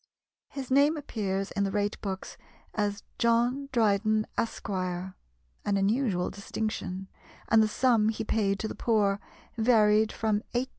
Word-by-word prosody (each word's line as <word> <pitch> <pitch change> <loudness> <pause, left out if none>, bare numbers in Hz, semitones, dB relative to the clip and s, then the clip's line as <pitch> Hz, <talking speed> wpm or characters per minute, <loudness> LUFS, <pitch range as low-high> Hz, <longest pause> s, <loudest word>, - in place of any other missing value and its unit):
His 265 -2 -7
name 285 +4 +4
appears 195 -8 -3
in 200 - 0
the 195 - 0
rate 205 +1 -1
books 190 -2 -5 0.4
as 205 -1 -1 0.2
"John 240 +4 +2
Dryden, 215 -2 +2
Esq." 230 - -2
an 185 -1 -3 0.5
unusual 200 -1 +1
distinction 200 -2 -4 0.4
and 225 0 +6
the 215 - +4
sum 225 -1 +3
he 220 - -2
paid 205 -2 +1
to 220 - -2
the - - -5
poor 205 -4 +1 0.4
varied 220 -2 +4
from 215 -2 0
18s. 255 +2 0
215 Hz, 140 wpm, -28 LUFS, 200-230 Hz, 0.5 s, and